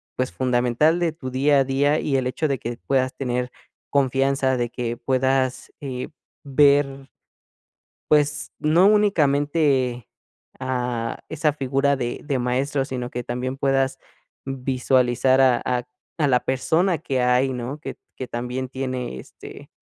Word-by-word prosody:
pues, 130 0 -1
fundamental 125 +6 +2
de 170 -2 +1
tu 145 -5 -7
día 140 +2 +3
a - - +4
día, 140 +3 +2
y 140 - -1
el 130 - -1
hecho 155 +5 -1
de 140 - 0
que 120 0 -5
puedas 130 -1 +1
tener 125 -1 -2 0.4
confianza 135 -1 +1
de 120 -1 -1
que 120 -1 -3
puedas, 130 0 0
eh, 130 -3 -5 0.3
ver 140 -1 +3 1.0
pues, 150 0 +2
no 165 +5 +4
únicamente, 145 - +2 0.5
a 125 -3 -2
esa 155 -1 0
figura 140 0 +1
de 120 -2 -3
de 140 -3 -1
maestro, 135 +3 0
sino 125 -2 -4
que 125 0 -4
también 125 +2 -3
puedas 135 -1 +1 0.5
visualizar 130 -1 +2
a 130 -2 +4
a 125 -1 -1 0.3
a 150 - +3
la 125 -2 +4
persona 160 +7 +1
que 135 -5 -1
hay, 125 +2 +2
¿no?, 125 +4 -5
Que - - -7 0.2
que 130 - -5
también 125 +2 -4
tiene, 130 - -4
este, - - -12
130 Hz, 140 wpm, -23 LUFS, 125-140 Hz, 1.0 s, a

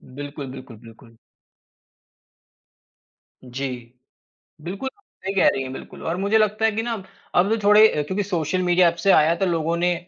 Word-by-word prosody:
बिल्कुल, 145 0 -7
बिल्कुल, 130 -3 -11
बिल्कुल। 115 0 -17 2.3
जी। 130 +2 -4 0.9
बिल्कुल, 195 - -5 0.4
सही 195 - -2
कह - - +4
रही 135 - -3
हैं 130 - -7
बिल्कुल - - -10
और 165 +2 -1
मुझे 200 +3 +2
लगता 215 0 +1
है 225 - +3
कि 220 +2 -2
ना 235 0 -2
अब, 200 -4 -6 0.3
अब 185 +3 +4
जो 225 - +1
थोड़े 210 +2 +7
अ, 150 - -1
क्योंकि 190 +7 -2
सोशल 185 -1 -1
मीडिया 175 0 +4
ऐप 170 - -6
से 195 - +6
आया 155 +2 +5
तो 195 - -1
लोगों 165 -2 0
ने 175 +1 +1
175 Hz, 180 wpm, -22 LUFS, 145-205 Hz, 2.3 s, थोड़े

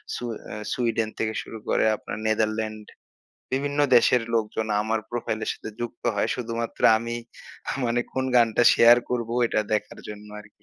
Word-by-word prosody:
সু - - -6 0.2
অ্যা - - -7 0.2
সুইডেন 115 -2 0
থেকে 110 0 -1
শুরু 110 - -9
করে - - +2
আপনার 105 - -7
নেদারল্যান্ড 110 0 -1 0.7
বিভিন্ন 145 +2 0 0.2
দেশের 125 0 +4
লোকজন 110 0 -1 0.2
আমার 110 0 -1
প্রোফাইল 115 -2 -2
এর - - -1
সাথে 110 - -8
যুক্ত 120 0 -6
হয়। 100 - 0
শুধুমাত্র 115 -1 -4 0.2
আমি 115 +1 -4 0.7
মানে 120 +1 +1
কোন 130 0 -1
গানটা 115 0 +4
শেয়ার 120 +1 +7
করবো 120 -2 -2
এটা 110 - 0
দেখার 105 - -2
জন্য 105 0 -9
আরকি। 105 - -16
115 Hz, 160 wpm, -25 LUFS, 110-120 Hz, 0.7 s, শেয়ার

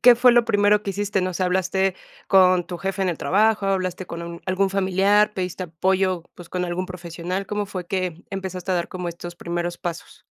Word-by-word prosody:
¿Qué 245 0 +8
fue 245 +1 +6
lo 240 -1 +5
primero 205 0 +3
que 200 - -2
hiciste? 200 0 -1
No 185 -1 -2
sé, 185 - -1
¿hablaste 190 +1 +1 0.3
con 185 -2 +5
tu 175 -1 -6
jefe 195 0 -2
en 190 - +1
el 170 - -5
trabajo, 210 +1 +2
hablaste 185 -2 -1
con 170 0 -7
algún 190 +1 +1
familiar, 195 +2 +3
pediste 185 0 -3
apoyo, 185 +2 0
pues, 175 -1 -12
con 180 0 -2
algún 180 +1 -2
profesional? 180 +1 -5
¿Cómo 205 0 -2
fue 185 -3 -6
que 180 -2 -3
empezaste 190 -1 -4
a - - +2
dar 175 -1 -1
como 180 -1 -4
estos 175 0 -8
primeros 175 0 -3
pasos? 170 -2 -6
185 Hz, 205 wpm, -23 LUFS, 175-195 Hz, 0.3 s, Qué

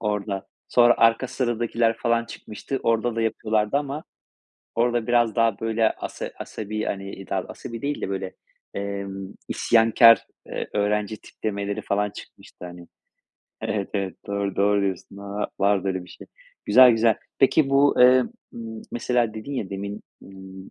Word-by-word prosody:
orada 100 -2 -2 0.2
sonra 120 -1 +5
Arka 115 +3 +4
Sıradakiler 120 -2 0
falan 115 0 +1
çıkmıştı. 115 +4 -6
Orada 115 0 +1
da - - 0
yapıyorlardı 110 +1 0
ama 145 +2 -3 0.7
orada 120 -1 +1
biraz 120 -2 +2
daha 115 -3 +2
böyle 115 0 +1
asa - - -6
asabi 110 0 -5
hani 100 -1 -4
i 95 - -11
dav 95 -1 -1
asabi 115 -1 -8
değil 145 +1 -2
de - - -3
böyle, 95 -1 -4 0.4
emm, 100 -1 -5
isyankâr, 115 0 +5 0.2
eee, - - -5
öğrenci 105 +1 0
tiplemeleri 100 -1 -4
falan 105 +1 0
çıkmıştı 90 - -12
hani. 90 -1 -10 0.7
Evet 100 -2 -2
evet, 100 -2 -2
doğru. 100 -1 -2
Doğru 100 +1 +3
diyorsun. 100 0 -3
A 100 +1 -4
vardı 100 -1 +2
öyle 95 -1 -2
bir - - -17
şey. - - -12 0.4
Güzel 130 -1 +8
güzel. 115 -1 +3 0.2
Peki 135 +1 +4
bu, 140 +1 +4
eee, 125 +1 +7 0.3
ımm, 110 -1 -7
mesela 120 -2 0
dedin 110 +6 -7
ya 105 -8 -3
demin, 100 +2 -5 0.2
ımm, 95 0 -12
110 Hz, 150 wpm, -24 LUFS, 100-115 Hz, 0.7 s, Güzel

